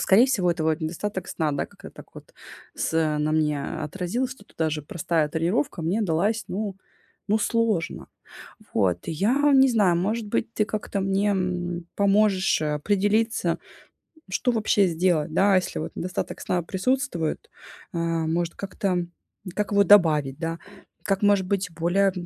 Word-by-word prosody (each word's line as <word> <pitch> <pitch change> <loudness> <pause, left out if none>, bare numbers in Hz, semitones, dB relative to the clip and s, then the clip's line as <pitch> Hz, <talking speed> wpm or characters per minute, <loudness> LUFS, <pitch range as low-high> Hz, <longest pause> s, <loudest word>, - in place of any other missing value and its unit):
скорее 215 +7 +5
всего, 200 -10 +1
это 170 -1 -2
вот 160 +1 +1
недостаток 180 +5 -4
сна, 160 -2 -1
да, 140 - -2
как-то - - -13
так - - -13
вот - - -13 0.4
с - - -2 0.3
на 150 +1 0
мне 150 -2 +1 0.2
отразился, 190 - -3
что - - -24
даже 155 -2 -1
простая 160 -1 -1
тренировка 170 - -1
мне 185 +8 0
далась, 205 +5 0
ну 200 0 -3 0.5
ну, 215 - +3
сложно. 220 -6 0 0.7
Вот, 90 -5 +2
я 245 - +2
не 265 0 +6
знаю, 200 -7 +3
может 215 +6 -1
быть, 230 +1 -1
ты 215 - +2
как-то 210 -2 -3
мне, 195 +2 +1
м, 175 -3 -2
поможешь, 200 -2 +3
э, 150 -1 0
определиться, 205 +1 +1 0.7
что 245 +6 +1
вообще 215 -3 +2
сделать, 170 -2 +1
да, 195 0 +4
если 185 - -1
вот - - -5
недостаток 180 0 -4
сна 180 - 0
присутствует, 190 - -1 0.5
э, 170 - -1
может 165 0 -1
как-то, 185 -2 -2 0.5
как 210 -1 -1
его 200 0 +5
добавить, 155 -9 +4
да, 165 0 -3 0.5
как 195 -1 0
может 205 -2 +3
быть 190 -1 -1
более 180 +4 +2
185 Hz, 150 wpm, -25 LUFS, 165-210 Hz, 0.7 s, не